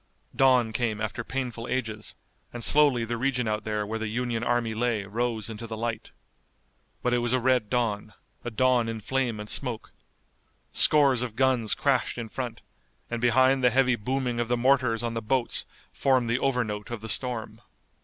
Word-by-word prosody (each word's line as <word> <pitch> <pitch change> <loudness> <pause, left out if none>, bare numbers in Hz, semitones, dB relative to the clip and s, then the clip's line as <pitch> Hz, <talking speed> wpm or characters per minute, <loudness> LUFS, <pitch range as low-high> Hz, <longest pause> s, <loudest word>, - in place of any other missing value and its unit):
Dawn 125 -4 +4
came 110 -2 -1
after 110 -4 -3
painful 125 -3 -4
ages, 110 -4 -3 0.4
and 120 -1 -6
slowly 140 -5 +4
the 120 +1 -3
region 125 -1 0
out 105 0 -2
there 105 -1 -1
where 110 +2 -4
the 110 - -3
Union 115 +1 -2
army 120 -2 0
lay 115 -2 0
rose 110 +1 -2
into 115 +1 -7
the 110 0 -6
light. 115 -1 -3 0.9
But 125 - +1
it 120 - +3
was 120 +1 -1
a 130 - +3
red 125 -3 +2
dawn, 110 -4 -1 0.3
a - - -3
dawn 120 0 +2
in 115 -1 -4
flame 120 -1 -1
and 105 - -6
smoke. 120 -1 -1 0.8
Scores 140 -5 +4
of 120 -3 -4
guns 125 -3 +2
crashed 135 -4 0
in 115 -2 -5
front, 125 -1 -5 0.5
and 120 -1 -2
behind 130 +2 +4
the 125 - +6
heavy 125 0 +3
booming 125 +2 -2
of 120 - 0
the 120 +1 +1
mortars 125 -2 +2
on 115 -1 -2
the 115 - -3
boats 125 +3 0 0.2
formed 130 -4 +1
the 120 - +1
overnote 120 -7 -1
of 120 -3 -5
the 110 - -6
storm. 110 -1 -2
120 Hz, 185 wpm, -27 LUFS, 110-125 Hz, 0.9 s, the